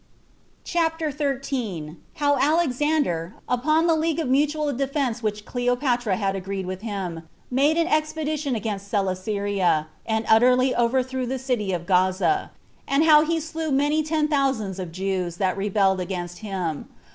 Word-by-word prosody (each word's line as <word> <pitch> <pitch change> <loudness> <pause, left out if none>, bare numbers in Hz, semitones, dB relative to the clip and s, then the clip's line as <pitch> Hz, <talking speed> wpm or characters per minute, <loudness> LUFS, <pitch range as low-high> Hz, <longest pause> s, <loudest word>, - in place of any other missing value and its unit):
CHAPTER 325 -2 0
13. 260 - -3 0.2
How 290 -3 +2
Alexander, 285 - +1
upon 305 +6 +2
the 335 - +4
League 320 0 0
of 325 - -1
Mutual 295 +2 +1
Defense 270 -3 -1
Which 210 -1 -3
Cleopatra 245 -3 0
Had 195 -1 -1
Agreed 195 0 -4
with 185 +1 -5
Him, 185 -7 -5 0.2
Made 285 +5 +3
an 335 - +3
Expedition 310 -3 -1
Against 205 -2 -4
Coelesyria, 195 -4 0 0.2
and 220 0 0
Utterly 250 +3 +5
Overthrew 255 +1 0
the 265 +2 -2
City 245 -6 -1
of 175 -2 -3
Gaza; 185 - +2 0.4
and 275 +3 +3
How 305 -2 +7
He 330 +1 0
Slew 320 0 -4
Many 290 +3 +2
Ten 310 0 0
Thousands 265 - 0
of 180 -3 -5
Jews 185 -1 -2
That 185 -1 0
Rebelled 195 -1 +1
Against 175 -1 -4
Him. 185 -8 -4
245 Hz, 145 wpm, -24 LUFS, 195-295 Hz, 0.4 s, How